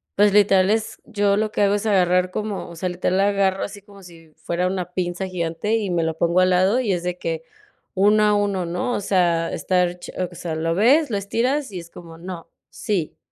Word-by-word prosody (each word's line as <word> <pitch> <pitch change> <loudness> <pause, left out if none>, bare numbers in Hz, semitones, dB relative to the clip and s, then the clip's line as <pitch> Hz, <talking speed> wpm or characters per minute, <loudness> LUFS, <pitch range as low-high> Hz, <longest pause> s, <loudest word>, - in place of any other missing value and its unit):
pues, 205 0 +4
literal 195 -2 +4
es 220 0 -1
yo 205 -2 +1
lo 215 0 0
que - - -1
hago 200 0 +3
es 205 +2 -3
agarrar 180 -2 +3
como 210 -1 -4
o 170 - -10
sea, 180 +2 -3
literal 180 +1 -1
la 200 - +4
agarro 195 -1 +1
así 205 0 -7
como 200 -1 -16
si 165 -3 -15
fuera 180 +1 -2
una 180 -2 -4
pinza 180 +1 -2
gigante 170 +3 -2
y 215 -3 -1
me 170 -1 +1
lo 160 0 -2
pongo 170 +2 +2
al 185 - +4
lado 190 +7 +3
y 215 -5 -1
es 175 -2 -1
de 180 0 -3
que 165 -2 -4 0.5
uno 210 +2 +4
a 210 - +4
uno, 200 -3 0
¿no? 175 +8 -2
O - - -1
sea, 175 -4 +1
estar 180 -1 0
che - - -10 0.2
o - - -13
sea, 165 -2 -4
lo 165 +1 -1
ves, 270 - +4
lo 205 - -1
estiras 245 +7 -1
y 185 - -5
es 170 - -11
como: 165 -1 -12
"No, 175 -1 -8 0.2
sí, 195 -8 -3
185 Hz, 230 wpm, -22 LUFS, 175-205 Hz, 0.5 s, pues